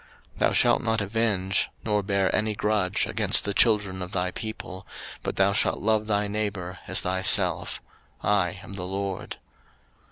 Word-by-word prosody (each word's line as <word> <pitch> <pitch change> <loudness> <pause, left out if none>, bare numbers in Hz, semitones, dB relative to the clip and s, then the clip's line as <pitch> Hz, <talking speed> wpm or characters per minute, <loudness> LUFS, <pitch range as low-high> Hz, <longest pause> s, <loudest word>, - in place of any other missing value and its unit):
03:019:018 - - -13
Thou - - +3
shalt - - +4
not 110 -1 0
avenge, 100 -3 +1
nor 105 -2 +1
bear 100 -1 +1
any 110 0 0
grudge 100 -2 +1
against - - +1
the 100 - 0
children 100 -3 +3
of 90 0 -6
thy 90 0 0
people, 95 -3 -7 0.3
but - - -3
thou 95 +1 +3
shalt 110 +3 +1
love 110 0 +1
thy 105 -1 +1
neighbour 100 -3 -3
as - - +1
thyself: 95 +1 +2 0.4
I 100 -4 +1
am 100 - -10
the 95 -2 -5
LORD. 95 0 -4
100 Hz, 160 wpm, -26 LUFS, 95-105 Hz, 0.4 s, shalt